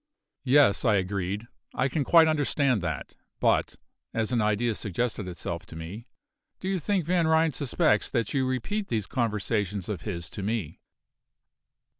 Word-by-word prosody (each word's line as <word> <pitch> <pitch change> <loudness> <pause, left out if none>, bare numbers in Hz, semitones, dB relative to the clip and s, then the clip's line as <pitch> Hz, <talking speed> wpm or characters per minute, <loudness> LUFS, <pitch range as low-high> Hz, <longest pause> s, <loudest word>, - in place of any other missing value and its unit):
"Yes," 135 -5 +5
I 110 -5 +4
agreed, 100 +3 -2 0.3
"I 130 - +2
can 140 +2 -1
quite 165 +3 +6
understand 145 -6 +2
that; 80 -5 -4 0.2
but," - - +2 0.4
as 110 +1 0
an 120 -2 +2
idea 105 +2 +1
suggested 105 0 -2
itself 85 -1 -5
to - - -11
me 85 +8 -8 0.5
"do 185 - -5
you 190 -1 0
think 185 +1 0
Van 170 -1 +2
Ryn 160 0 +4
suspects 125 -6 +1
that 115 -1 -1
you 135 -2 +1
repeat 195 - -2
these 110 -4 -1
conversations 105 -4 -1
of 100 -6 -3
his 85 -5 -5
to - - -6
me?" 100 -6 -3
115 Hz, 155 wpm, -27 LUFS, 100-140 Hz, 0.5 s, quite